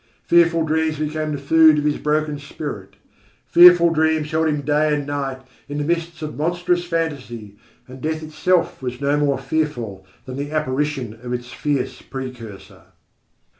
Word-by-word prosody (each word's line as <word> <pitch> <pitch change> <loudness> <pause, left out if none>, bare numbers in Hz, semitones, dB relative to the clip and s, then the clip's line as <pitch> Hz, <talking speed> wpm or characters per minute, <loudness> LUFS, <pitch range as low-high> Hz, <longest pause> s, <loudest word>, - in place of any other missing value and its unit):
Fearful 170 -1 +3
dreams 160 0 0
became 155 0 -2
the 145 - -2
food 155 +2 +5
of 145 - 0
his 150 -1 0
broken 150 -1 -1
spirit. 140 - -7 0.5
Fearful 175 -1 +7
dreams 160 -1 +1
held 160 0 +1
him 150 -2 0
day 150 +2 +1
and 145 -1 -3
night 135 -2 -4 0.3
in 145 - -4
the 145 - -1
mists 170 +1 -2
of 150 - -5
monstrous 175 +3 0
fantasy, 140 - -4 0.3
and 130 0 -11
death 155 0 -2
itself 170 +2 0
was 125 -1 -5
no 140 +1 +1
more 145 -2 +1
fearful 135 -8 -3 0.2
than 130 0 -7
the 145 +1 -4
apparition 145 -5 -2
of 125 0 -5
its 120 0 -5
fierce 135 -3 -2
precursor. 125 -6 -9
150 Hz, 160 wpm, -21 LUFS, 135-160 Hz, 0.5 s, Fearful